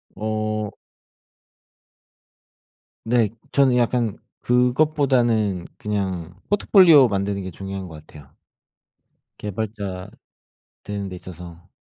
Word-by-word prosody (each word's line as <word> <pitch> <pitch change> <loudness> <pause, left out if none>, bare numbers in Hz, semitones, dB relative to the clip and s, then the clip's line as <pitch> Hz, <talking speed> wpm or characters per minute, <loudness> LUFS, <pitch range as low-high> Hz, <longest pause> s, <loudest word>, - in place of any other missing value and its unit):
어. 110 0 -2 2.3
네. 115 -3 +2 0.2
저는 135 -3 +4
약간 120 -3 +1 0.2
그것보다는 125 - +2
그냥 95 -5 -3
포트폴리오 180 - +6
만드는 100 -1 -1
게 95 - -6
중요한 95 +1 -6
것 75 -2 -12
같아요. 75 -3 -15 1.1
개발자 100 -2 -5 0.7
되는 100 -1 -4
데 90 - -7
있어서. 90 0 -11
105 Hz, 195 characters per minute, -22 LUFS, 95-120 Hz, 2.3 s, 포트폴리오